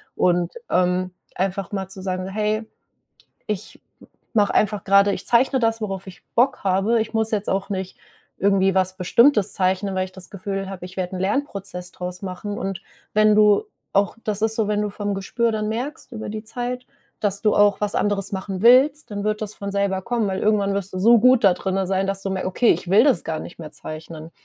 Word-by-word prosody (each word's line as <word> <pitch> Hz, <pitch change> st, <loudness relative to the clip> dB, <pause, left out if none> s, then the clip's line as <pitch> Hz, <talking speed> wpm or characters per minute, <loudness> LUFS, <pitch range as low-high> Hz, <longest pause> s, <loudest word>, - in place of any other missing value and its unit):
und, 175 Hz, -1 st, +1 dB, 0.2 s
ähm, 180 Hz, 0 st, +1 dB, 0.2 s
einfach 190 Hz, 0 st, -2 dB
mal 195 Hz, -2 st, -3 dB
zu 190 Hz, 0 st, -8 dB
sagen: 185 Hz, -1 st, -3 dB
„Hey, 215 Hz, +2 st, -1 dB, 0.8 s
ich 210 Hz, +1 st, -5 dB, 0.2 s
m -, -, -16 dB, 0.3 s
mache 210 Hz, -3 st, +2 dB
einfach 210 Hz, -1 st, +1 dB
grade 200 Hz, +1 st, +5 dB
ich 185 Hz, -, -2 dB
zeichne 260 Hz, +3 st, +3 dB
das, 225 Hz, -1 st, 0 dB
worauf 195 Hz, -2 st, -4 dB
ich 185 Hz, -, -12 dB
Bock 250 Hz, +3 st, +2 dB
habe. 200 Hz, +4 st, +2 dB
Ich 220 Hz, -, -5 dB
muss 220 Hz, 0 st, +1 dB
jetzt 210 Hz, -2 st, -1 dB
auch 195 Hz, 0 st, -1 dB
nicht 190 Hz, -2 st, -4 dB, 0.4 s
irgendwie 195 Hz, -1 st, +3 dB
was 185 Hz, 0 st, +1 dB
Bestimmtes 210 Hz, +2 st, +4 dB
zeichnen, 190 Hz, +1 st, 0 dB
weil 185 Hz, 0 st, 0 dB
ich 185 Hz, -, -14 dB
das 190 Hz, -1 st, -8 dB
Gefühl 195 Hz, 0 st, -4 dB
habe, 185 Hz, -2 st, -7 dB
ich 180 Hz, +1 st, -11 dB
werde 185 Hz, 0 st, -3 dB
'n -, -, -5 dB
Lernprozess 195 Hz, -4 st, -3 dB
draus 180 Hz, 0 st, -6 dB
machen.” 195 Hz, +2 st, -5 dB
Und 195 Hz, -5 st, -4 dB, 0.3 s
wenn 215 Hz, 0 st, +5 dB
du 210 Hz, -, +5 dB, 0.3 s
auch 200 Hz, 0 st, +2 dB
das 210 Hz, -1 st, -2 dB
ist 220 Hz, 0 st, +1 dB
so, 220 Hz, -2 st, 0 dB
wenn 210 Hz, 0 st, +1 dB
du 210 Hz, -, -1 dB
vom 205 Hz, 0 st, -3 dB
Gespür 230 Hz, +4 st, -1 dB
dann 215 Hz, -1 st, -2 dB
merkst 255 Hz, +7 st, -4 dB
über 220 Hz, -2 st, -6 dB
die 215 Hz, 0 st, -5 dB
Zeit, 245 Hz, +2 st, -4 dB, 0.4 s
dass 200 Hz, -1 st, 0 dB
du 210 Hz, -, +4 dB
auch 205 Hz, 0 st, +4 dB
was 205 Hz, -1 st, 0 dB
anderes 205 Hz, -1 st, 0 dB
machen 190 Hz, -1 st, -4 dB
willst, 265 Hz, +4 st, +5 dB
dann 205 Hz, -1 st, -4 dB
wird 215 Hz, 0 st, -1 dB
das 210 Hz, 0 st, -5 dB
von 200 Hz, -, -5 dB
selber 200 Hz, -1 st, 0 dB
kommen, 235 Hz, 0 st, -1 dB
weil 190 Hz, -1 st, -2 dB
irgendwann 205 Hz, -2 st, +2 dB
wirst 195 Hz, -1 st, -3 dB
du -, -, -3 dB
so 230 Hz, +4 st, +6 dB
gut 255 Hz, +1 st, +5 dB
da 195 Hz, -3 st, +6 dB
drinne 190 Hz, +1 st, -2 dB
sein, 195 Hz, 0 st, 0 dB
dass 195 Hz, 0 st, -2 dB
du 195 Hz, -, -2 dB
merkst: 190 Hz, -1 st, -2 dB
„Okay, 225 Hz, +6 st, +3 dB
ich 175 Hz, -, -2 dB
will 205 Hz, +5 st, +6 dB
das 265 Hz, -, +2 dB
gar 160 Hz, -1 st, -2 dB
nicht 170 Hz, -, -11 dB
mehr 155 Hz, -2 st, -8 dB
zeichnen.“ 155 Hz, +1 st, -8 dB
200 Hz, 215 wpm, -22 LUFS, 190-215 Hz, 0.8 s, so